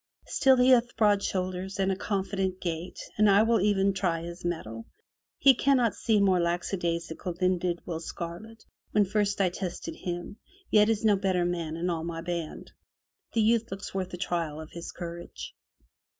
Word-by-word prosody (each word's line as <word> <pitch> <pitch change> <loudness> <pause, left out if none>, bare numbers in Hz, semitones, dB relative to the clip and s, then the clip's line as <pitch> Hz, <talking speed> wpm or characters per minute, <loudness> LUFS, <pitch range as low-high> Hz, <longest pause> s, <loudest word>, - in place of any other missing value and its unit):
Still 265 -1 +4
he 250 +1 +5
hath 240 -2 +4
broad 205 -2 +4
shoulders 185 0 -3
and 195 0 +1
a - - 0
confident 190 -1 -2
gait. 170 0 -4 0.2
I 205 0 +6
will 225 -1 +3
e'en 200 -1 +2
try 175 -3 -1
his 170 +1 -8
mettle. 115 -10 -4 0.5
He 275 - +7
cannot 250 -3 +2
seem 215 -3 +2
more 190 -2 +4
lackadaisical 170 -1 -2
59 - - -20
MY 185 +1 +2
BOOK 175 - -4
HOUSE - - -3
than 175 - +1
did - - -24
Will 165 -2 -4
Scarlet, 175 +7 -7 0.3
when 210 -1 +4
first 205 +1 0
I 190 -2 +3
tested 190 - -5
him, 175 +3 -5 0.3
yet 210 0 +5
is 220 -1 0
no 210 -2 +5
better 190 -2 +1
man 165 -2 -2
in 175 +2 -1
all 165 -1 -2
my 165 0 -4
band. 170 -2 -5 0.6
The 225 - +2
youth 230 +1 +2
looks 195 +1 -7
worth 190 -1 -3
a 180 - -5
trial 165 -4 -2
of 160 0 -9
his 170 0 -7
courage.' 170 -1 -8
185 Hz, 190 wpm, -28 LUFS, 170-205 Hz, 0.6 s, He